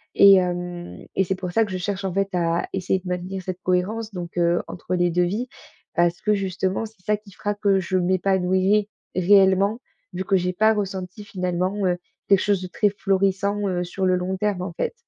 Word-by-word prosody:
et 200 Hz, -1 st, +9 dB
hem, 175 Hz, -1 st, -3 dB
et 195 Hz, -, +3 dB
c'est 190 Hz, +2 st, -1 dB
pour 185 Hz, -1 st, -5 dB
ça 225 Hz, +5 st, +3 dB
que 205 Hz, -, -9 dB
je -, -, -1 dB
cherche, 195 Hz, +1 st, -3 dB
en 190 Hz, -, -2 dB
fait, 195 Hz, +1 st, 0 dB
à 170 Hz, -1 st, 0 dB
essayer 190 Hz, 0 st, 0 dB
de 180 Hz, -, -12 dB
maintenir 180 Hz, +1 st, -4 dB
cette 185 Hz, 0 st, -5 dB
cohérence 210 Hz, +5 st, -1 dB
donc 175 Hz, -1 st, -7 dB
heu, 170 Hz, 0 st, +2 dB
entre 180 Hz, +2 st, -4 dB
les 175 Hz, -1 st, +2 dB
2 180 Hz, +1 st, +2 dB
vies. 215 Hz, +8 st, -2 dB, 0.5 s
Parce 170 Hz, 0 st, +1 dB
que, 210 Hz, 0 st, +2 dB
justement, 190 Hz, +1 st, -1 dB
c'est 215 Hz, -4 st, -15 dB
ça 210 Hz, 0 st, +2 dB
qui 205 Hz, -1 st, -17 dB
fera 205 Hz, +2 st, -2 dB
que 200 Hz, -2 st, +2 dB
je 185 Hz, +1 st, -1 dB
m'épanouirais 190 Hz, +2 st, +2 dB, 0.3 s
réellement, 195 Hz, +4 st, +4 dB, 0.3 s
vu 185 Hz, +1 st, -3 dB
que 190 Hz, 0 st, +2 dB
j'ai 180 Hz, 0 st, -1 dB
pas 220 Hz, +4 st, +4 dB
ressenti 195 Hz, 0 st, -4 dB
finalement, 185 Hz, +1 st, -1 dB
heu, 180 Hz, -1 st, +1 dB, 0.3 s
quelque 195 Hz, -1 st, +6 dB
chose 200 Hz, -2 st, +1 dB
de 185 Hz, -, -5 dB
très 205 Hz, +3 st, +1 dB
florissant, 200 Hz, 0 st, 0 dB
heu, 180 Hz, -2 st, -1 dB
sur 190 Hz, +2 st, -3 dB
le 185 Hz, 0 st, +3 dB
long 185 Hz, +1 st, -2 dB
terme, 205 Hz, -2 st, -1 dB
en 180 Hz, -1 st, -4 dB
fait. -, -, -2 dB
190 Hz, 210 wpm, -23 LUFS, 180-200 Hz, 0.5 s, et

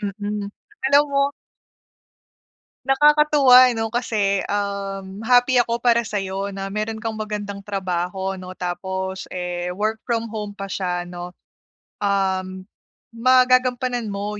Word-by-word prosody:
Mm, 205 Hz, 0 st, -4 dB, 0.4 s
alam 285 Hz, +1 st, +6 dB
mo 275 Hz, 0 st, +2 dB, 1.6 s
nakakatuwa 285 Hz, -2 st, +6 dB
ano, 225 Hz, 0 st, -2 dB
kasi, 210 Hz, -5 st, 0 dB
um, 200 Hz, -1 st, -3 dB
happy 245 Hz, 0 st, +5 dB
ako 235 Hz, 0 st, 0 dB
para 235 Hz, -1 st, +4 dB
sa'yo 195 Hz, -3 st, -3 dB
na 195 Hz, 0 st, -5 dB
meron 215 Hz, +2 st, -2 dB
kang 220 Hz, -1 st, -3 dB
magandang 205 Hz, -2 st, -4 dB
trabaho, 190 Hz, -1 st, -3 dB
'no, 185 Hz, 0 st, -9 dB
tapos, 190 Hz, +1 st, -4 dB
eh, 180 Hz, -1 st, -4 dB
work 215 Hz, +2 st, -1 dB
from 230 Hz, -2 st, -1 dB
home 210 Hz, -2 st, -5 dB
pa 195 Hz, -1 st, -6 dB
siya, 180 Hz, -2 st, -2 dB
'no. 175 Hz, 0 st, -8 dB, 0.6 s
Um, 190 Hz, -2 st, -1 dB, 0.5 s
magagampanan 255 Hz, -1 st, +3 dB
mo 205 Hz, +1 st, -4 dB
205 Hz, 115 wpm, -22 LUFS, 190-235 Hz, 1.6 s, alam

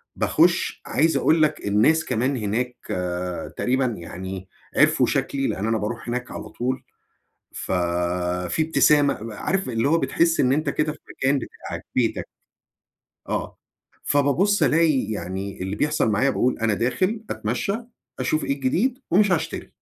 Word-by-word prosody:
باخش -, -, +2 dB
عايز 160 Hz, +6 st, +2 dB
أقول 160 Hz, +1 st, +3 dB
لك 150 Hz, -8 st, 0 dB
الناس 115 Hz, +11 st, +3 dB
كمان 130 Hz, +2 st, 0 dB
هناك 120 Hz, +4 st, -2 dB, 0.2 s
آآ، 90 Hz, 0 st, -3 dB
تقريبًا 130 Hz, +1 st, +1 dB
يعني 95 Hz, -2 st, -5 dB, 0.3 s
عرفوا -, -, +5 dB
شكلي، 135 Hz, -1 st, 0 dB
لأن 105 Hz, +4 st, -2 dB
أنا 115 Hz, 0 st, +2 dB
باروح 115 Hz, +3 st, -4 dB
هناك 125 Hz, +1 st, -3 dB
على -, -, -7 dB
طول 130 Hz, +2 st, -3 dB, 0.7 s
ففيه 90 Hz, -, -1 dB
إبتسامة، 145 Hz, -8 st, +3 dB
عارف 190 Hz, -, -1 dB
اللي 115 Hz, +3 st, +1 dB
هو 165 Hz, +2 st, +4 dB
بتحس 165 Hz, +1 st, +2 dB
إن 130 Hz, 0 st, +3 dB
أنت 150 Hz, 0 st, +1 dB
كده 150 Hz, +1 st, 0 dB
في -, -, -14 dB, 0.2 s
مكان 135 Hz, +1 st, +2 dB
بتاعك -, -, -8 dB
بيتك. -, -, +1 dB, 1.0 s
آه، -, -, -3 dB, 0.5 s
فبابص 145 Hz, +9 st, +2 dB
ألاقي 155 Hz, -4 st, +4 dB
يعني 95 Hz, 0 st, -5 dB
اللي 95 Hz, +2 st, -3 dB
بيحصل 150 Hz, -5 st, +1 dB
معايا 130 Hz, +7 st, +2 dB
باقول 125 Hz, -1 st, +1 dB
أنا 110 Hz, -2 st, +1 dB
داخل 185 Hz, -, 0 dB
أتمشى، 200 Hz, -, -1 dB, 0.5 s
أشوف 155 Hz, +5 st, 0 dB
إيه -, -, 0 dB
الجديد 180 Hz, -, 0 dB
ومش 195 Hz, +1 st, +4 dB
هاشتري. 165 Hz, -, -2 dB
125 Hz, 140 wpm, -23 LUFS, 100-155 Hz, 1.0 s, عرفوا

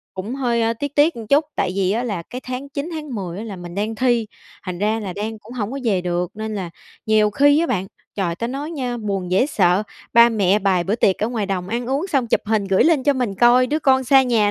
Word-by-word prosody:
Cũng 200 Hz, +6 st, -5 dB
hơi 235 Hz, -4 st, 0 dB
tiếc 285 Hz, +4 st, -5 dB
tiếc 295 Hz, +1 st, +3 dB
một 230 Hz, -, -6 dB
chút, 290 Hz, +5 st, +4 dB
tại 180 Hz, -, 0 dB
vì 190 Hz, -2 st, +1 dB
á 230 Hz, +3 st, 0 dB
là 205 Hz, -8 st, -3 dB
cái 250 Hz, +9 st, -8 dB
tháng 255 Hz, +2 st, -5 dB
9, 280 Hz, +3 st, -4 dB
tháng 305 Hz, -5 st, -6 dB
10 185 Hz, -4 st, -5 dB
á 215 Hz, -, -5 dB
là 210 Hz, -4 st, -7 dB
mình 175 Hz, -1 st, -9 dB
đang 210 Hz, +3 st, -2 dB
thi, 240 Hz, -1 st, +1 dB, 0.4 s
thành 180 Hz, -2 st, -5 dB
ra 215 Hz, +3 st, 0 dB
là 195 Hz, -4 st, -5 dB
đang 215 Hz, +3 st, -5 dB
cũng 215 Hz, +3 st, -14 dB
hổng 225 Hz, -2 st, -3 dB
có 275 Hz, -, -4 dB
về 200 Hz, -6 st, +2 dB
được. 175 Hz, 0 st, -2 dB
Nên 220 Hz, 0 st, -4 dB
là 185 Hz, -4 st, -4 dB, 0.4 s
nhiều 215 Hz, -1 st, +3 dB
khi 285 Hz, +7 st, +4 dB
á 335 Hz, -, +1 dB
bạn, 190 Hz, -, -1 dB, 0.3 s
trời, 180 Hz, -4 st, -1 dB
ta 230 Hz, +7 st, -3 dB
nói 275 Hz, +5 st, -5 dB
nha, 255 Hz, -6 st, -3 dB
buồn 195 Hz, -5 st, -3 dB
dễ 190 Hz, +8 st, +3 dB
sợ, 190 Hz, -8 st, +2 dB, 0.3 s
ba 235 Hz, 0 st, +7 dB
mẹ 205 Hz, -3 st, +2 dB
bày 190 Hz, -3 st, +1 dB
bữa 195 Hz, -, 0 dB
tiệc 195 Hz, -4 st, +2 dB
ở 215 Hz, -, +1 dB
ngoài 225 Hz, -4 st, -2 dB
đồng 185 Hz, -2 st, -3 dB
ăn 235 Hz, +3 st, -3 dB
uống 275 Hz, +7 st, -1 dB
xong 275 Hz, -9 st, 0 dB
chụp -, -, +1 dB
hình 215 Hz, -1 st, +1 dB
gửi 195 Hz, -1 st, +3 dB
lên 320 Hz, -5 st, +3 dB
cho 285 Hz, -, +4 dB
mình 250 Hz, -7 st, -2 dB
coi 240 Hz, +4 st, +5 dB
đứa 300 Hz, +4 st, 0 dB
con 265 Hz, -3 st, +3 dB
xa 270 Hz, +1 st, +6 dB
nhà 225 Hz, -5 st, +2 dB
225 Hz, 265 wpm, -21 LUFS, 195-255 Hz, 0.4 s, ba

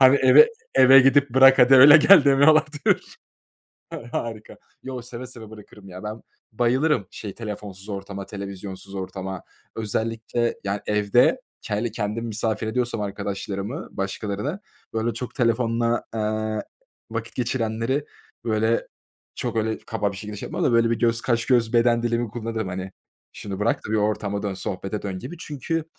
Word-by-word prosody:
Hani; 130 Hz, +1 st, +7 dB
"Eve, 140 Hz, -, +7 dB, 0.3 s
eve 135 Hz, +1 st, +8 dB
gidip 135 Hz, +1 st, +4 dB
bırak, 130 Hz, +1 st, +6 dB
hadi 125 Hz, +2 st, +7 dB
öyle 145 Hz, +4 st, +10 dB
gel." 155 Hz, 0 st, +7 dB
demiyorlardır. 145 Hz, +2 st, +3 dB, 0.7 s
Ha -, -, -7 dB
harika. 110 Hz, -2 st, -5 dB, 0.3 s
Yo, 130 Hz, -2 st, -6 dB
seve 125 Hz, +1 st, -8 dB
seve 115 Hz, -4 st, -11 dB
bırakırım 105 Hz, -2 st, -14 dB
ya. 90 Hz, +1 st, -10 dB
Ben 110 Hz, +1 st, -6 dB, 0.3 s
bayılırım 120 Hz, 0 st, +1 dB
şey, 105 Hz, -3 st, -8 dB
telefonsuz 105 Hz, -3 st, -8 dB
ortama, 100 Hz, -1 st, -6 dB
televizyonsuz 100 Hz, -1 st, -8 dB
ortama. 95 Hz, -1 st, -6 dB, 0.3 s
Özellikle, 115 Hz, +2 st, -2 dB
yani, 100 Hz, +1 st, -2 dB
evde 105 Hz, -, +3 dB, 0.3 s
hele 110 Hz, +2 st, -2 dB
kendim 110 Hz, +2 st, -3 dB
misafir 110 Hz, 0 st, -2 dB
ediyorsam 120 Hz, 0 st, -2 dB
arkadaşlarımı, 100 Hz, -, -5 dB
başkalarını 105 Hz, -, -4 dB, 0.3 s
böyle 115 Hz, +1 st, -1 dB
çok 125 Hz, -, -6 dB
telefonla, 115 Hz, -1 st, 0 dB
eee, 110 Hz, 0 st, -2 dB, 0.5 s
vakit 115 Hz, 0 st, -5 dB
geçirenleri 120 Hz, +3 st, -1 dB, 0.4 s
böyle 110 Hz, +1 st, 0 dB, 0.5 s
çok 120 Hz, -2 st, -4 dB
öyle 110 Hz, 0 st, -1 dB
kaba 105 Hz, -3 st, -3 dB
bir -, -, -9 dB
şekilde 105 Hz, +1 st, -7 dB
şey -, -, -6 dB
yapmam -, -, -3 dB
da -, -, +2 dB
böyle 115 Hz, 0 st, +3 dB
bir 115 Hz, -, 0 dB
göz 115 Hz, -1 st, +1 dB
kaş, 120 Hz, -2 st, 0 dB
göz, 120 Hz, -3 st, +2 dB
beden 120 Hz, 0 st, +3 dB
dilimi 120 Hz, 0 st, -1 dB
kullanırım, 110 Hz, -2 st, -4 dB
hani; 95 Hz, +1 st, -6 dB, 0.4 s
"Şunu 100 Hz, -1 st, -7 dB
bırak 110 Hz, -, +1 dB
da -, -, -7 dB
bir -, -, +2 dB
ortama 105 Hz, -1 st, -1 dB
dön, 100 Hz, -2 st, -3 dB
sohbete 95 Hz, +2 st, -5 dB
dön." 95 Hz, -2 st, -4 dB
gibi. 175 Hz, -, -8 dB
Çünkü, 160 Hz, +1 st, -4 dB
115 Hz, 150 wpm, -23 LUFS, 105-125 Hz, 0.7 s, öyle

